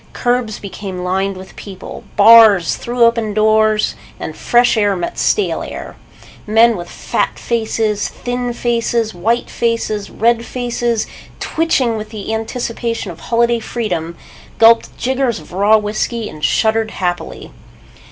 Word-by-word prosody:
Curbs 245 Hz, -3 st, -1 dB
became 190 Hz, -2 st, -7 dB
lined 190 Hz, +1 st, -1 dB
with 190 Hz, 0 st, -12 dB
people. 190 Hz, -2 st, -9 dB
Bars 210 Hz, -4 st, +7 dB
threw 240 Hz, 0 st, -1 dB
open 230 Hz, -3 st, +2 dB
doors 215 Hz, 0 st, +3 dB, 0.3 s
and -, -, -6 dB
fresh 240 Hz, 0 st, +3 dB
air 205 Hz, -2 st, +2 dB
met 175 Hz, -1 st, -4 dB
stale 420 Hz, -, +1 dB
air. -, -, -7 dB, 0.5 s
Men 225 Hz, +2 st, +5 dB
with 175 Hz, -2 st, -7 dB
fat -, -, -2 dB
faces, 220 Hz, -2 st, -1 dB
thin 245 Hz, 0 st, -4 dB
faces, 235 Hz, -2 st, -1 dB
white 225 Hz, +7 st, 0 dB
faces, 230 Hz, -3 st, -2 dB
red 230 Hz, +1 st, +1 dB
faces, 240 Hz, -2 st, -2 dB, 0.3 s
twitching 265 Hz, -8 st, 0 dB
with 215 Hz, 0 st, -6 dB
the 215 Hz, 0 st, -5 dB
anticipation 230 Hz, -1 st, -3 dB
of 170 Hz, -, -12 dB
holiday 235 Hz, 0 st, +1 dB
freedom, 175 Hz, -8 st, -4 dB, 0.4 s
gulped 230 Hz, 0 st, +4 dB
jiggers 260 Hz, -4 st, 0 dB
of 155 Hz, -, -14 dB
raw 205 Hz, +4 st, +4 dB
whiskey 215 Hz, +2 st, -2 dB
and 155 Hz, -5 st, -11 dB
shuddered 220 Hz, 0 st, +2 dB
happily. 180 Hz, -4 st, -4 dB
220 Hz, 130 wpm, -17 LUFS, 205-235 Hz, 0.5 s, Bars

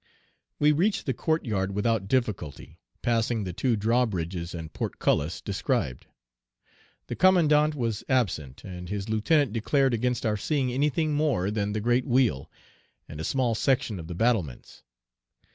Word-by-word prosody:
We 150 Hz, 0 st, +4 dB
reached 195 Hz, +8 st, +1 dB
the 130 Hz, -, 0 dB
court 160 Hz, +6 st, -1 dB
yard 100 Hz, -4 st, -1 dB
without 105 Hz, -1 st, 0 dB
difficulty, 110 Hz, -, -2 dB, 0.2 s
passing 115 Hz, -1 st, +1 dB
the 90 Hz, -2 st, -5 dB
two 120 Hz, +6 st, +1 dB
drawbridges 95 Hz, -7 st, -1 dB
and 80 Hz, -2 st, -7 dB
portcullis 75 Hz, +4 st, -1 dB
described. 65 Hz, -2 st, -2 dB, 1.0 s
The -, -, -5 dB
commandant 155 Hz, -5 st, +4 dB
was 115 Hz, -6 st, -2 dB
absent; 85 Hz, -, -1 dB
and 90 Hz, -2 st, -8 dB
his 100 Hz, +1 st, -4 dB
lieutenant 115 Hz, +4 st, +2 dB
declared 135 Hz, +3 st, +1 dB
against 120 Hz, +1 st, -1 dB
our 105 Hz, -1 st, +1 dB
seeing 135 Hz, +2 st, 0 dB
anything 150 Hz, +3 st, +1 dB
more 140 Hz, -11 st, +1 dB
than 105 Hz, -1 st, -1 dB
the 110 Hz, -, -2 dB
great 120 Hz, +3 st, +1 dB
wheel, 120 Hz, -, +1 dB, 0.6 s
and 75 Hz, -, -9 dB
a -, -, -4 dB
small 125 Hz, +3 st, +1 dB
section 115 Hz, -4 st, 0 dB
of 80 Hz, -, -8 dB
the 85 Hz, -, -6 dB
battlements. 95 Hz, -, -1 dB
115 Hz, 145 wpm, -27 LUFS, 95-135 Hz, 1.0 s, We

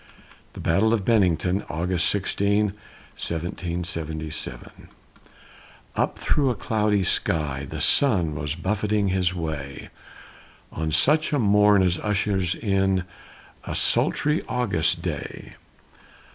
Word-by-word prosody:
THE -, -, -10 dB
BATTLE 105 Hz, +7 st, +2 dB
OF 100 Hz, -4 st, -3 dB
BENNINGTON 95 Hz, -4 st, +2 dB
[August 85 Hz, +3 st, 0 dB
16, 100 Hz, +1 st, +1 dB, 0.4 s
1777] 85 Hz, -2 st, -5 dB, 1.1 s
Up -, -, 0 dB
through 140 Hz, -3 st, +1 dB
a 125 Hz, -, 0 dB
cloudy 105 Hz, -2 st, +1 dB
sky, 70 Hz, -6 st, 0 dB
the -, -, -5 dB
sun 95 Hz, -, +3 dB
Was 75 Hz, 0 st, -3 dB
buffeting 105 Hz, +3 st, 0 dB
his 90 Hz, -1 st, 0 dB
way, 75 Hz, -5 st, -5 dB, 0.8 s
On 80 Hz, 0 st, -3 dB
such 150 Hz, -, +3 dB
a 145 Hz, -, +2 dB
morn 105 Hz, -3 st, +4 dB
as 90 Hz, -2 st, +1 dB
ushers 95 Hz, -3 st, 0 dB
in 95 Hz, -3 st, +1 dB, 0.6 s
A -, -, -5 dB
sultry 150 Hz, +3 st, +2 dB
August 85 Hz, -10 st, 0 dB
day. 80 Hz, -5 st, -5 dB
95 Hz, 105 wpm, -24 LUFS, 80-105 Hz, 1.1 s, morn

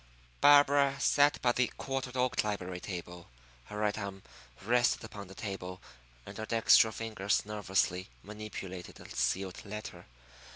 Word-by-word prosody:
Barbara 145 Hz, -1 st, +6 dB
sat 145 Hz, +1 st, +4 dB
by 120 Hz, -, +4 dB
the 125 Hz, 0 st, +2 dB
quartered 130 Hz, -1 st, -4 dB
oak 125 Hz, 0 st, +1 dB
library 95 Hz, -4 st, -3 dB
table. 90 Hz, -2 st, -7 dB, 0.4 s
Her 105 Hz, -, -8 dB
right 105 Hz, -1 st, +1 dB
arm 100 Hz, -1 st, -6 dB, 0.4 s
rested 120 Hz, +3 st, +2 dB
upon 105 Hz, -3 st, -8 dB
the 95 Hz, -, -12 dB
table, 95 Hz, -3 st, -6 dB, 0.5 s
and -, -, -9 dB
her 110 Hz, -, -4 dB
dextral 115 Hz, -1 st, +5 dB
fingers 105 Hz, -3 st, -1 dB
nervously 95 Hz, -3 st, -1 dB
manipulated 100 Hz, -3 st, -8 dB
a -, -, -11 dB
sealed 95 Hz, -1 st, -1 dB
letter. 105 Hz, +1 st, -8 dB
105 Hz, 135 wpm, -31 LUFS, 95-120 Hz, 0.5 s, Barbara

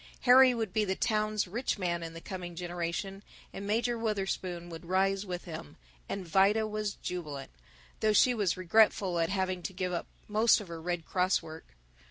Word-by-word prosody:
Harry 255 Hz, +1 st, +7 dB
would 220 Hz, -5 st, -3 dB
be 215 Hz, -, +2 dB
the 190 Hz, -2 st, -1 dB
town's 215 Hz, -1 st, 0 dB
rich 235 Hz, +8 st, -2 dB
man 175 Hz, -3 st, -1 dB
in 165 Hz, 0 st, -7 dB
the -, -, -6 dB
coming 175 Hz, -2 st, -6 dB
generation, 175 Hz, +3 st, -4 dB, 0.3 s
and 200 Hz, -, -6 dB
Major 235 Hz, +3 st, 0 dB
Wutherspoon 190 Hz, -5 st, -2 dB
would 165 Hz, 0 st, -9 dB
rise 195 Hz, +2 st, +1 dB
with 180 Hz, -1 st, -4 dB
him, 160 Hz, -, -8 dB, 0.3 s
and 195 Hz, -3 st, -4 dB
Vida 200 Hz, +6 st, +4 dB
was 215 Hz, -1 st, -3 dB
jubilant, 150 Hz, -6 st, -6 dB, 0.5 s
though 215 Hz, -, +3 dB
she 245 Hz, +4 st, +5 dB
was 205 Hz, -7 st, 0 dB
regretful 185 Hz, -1 st, +3 dB
at 165 Hz, -, +1 dB
having 190 Hz, -2 st, -1 dB
to 190 Hz, -, -5 dB
give 180 Hz, 0 st, -2 dB
up 170 Hz, -, -3 dB, 0.2 s
most 215 Hz, +2 st, +4 dB
of 205 Hz, -5 st, -9 dB
her 165 Hz, -1 st, -7 dB
Red 175 Hz, -1 st, -3 dB
Cross 185 Hz, -1 st, +1 dB
work. 160 Hz, -, -11 dB
190 Hz, 185 wpm, -30 LUFS, 175-215 Hz, 0.5 s, Harry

